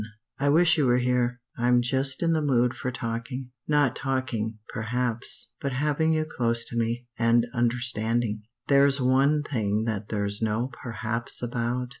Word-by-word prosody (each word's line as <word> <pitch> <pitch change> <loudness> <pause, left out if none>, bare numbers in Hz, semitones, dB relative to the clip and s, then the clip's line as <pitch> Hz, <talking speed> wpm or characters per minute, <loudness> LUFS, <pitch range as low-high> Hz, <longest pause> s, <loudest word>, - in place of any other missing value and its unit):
"I 140 +1 +2
wish 165 +2 +5
you 140 - +3
were 120 0 +4
here. 125 -1 0 0.2
I'm 120 0 +3
just 130 +3 +1
in 165 0 +2
the 160 - +1
mood 125 -4 +2
for 130 - -4
talking 120 +2 -5 0.2
not 145 -4 +2
talking, 130 -5 -2
perhaps, 125 - -1
but 140 -3 -2
having 150 +4 +1
you 155 0 +1
close 115 -6 -1
to - - -7
me, 115 +1 -1
and 115 0 +4
understanding. 120 -2 0 0.3
"There's 140 0 +4
one 135 +4 +3
thing 110 -6 -1
that 110 -2 -3
there's 105 0 -2
no 110 +3 0
perhaps 115 0 -3
about. 120 +1 -2
125 Hz, 155 wpm, -26 LUFS, 115-135 Hz, 0.3 s, wish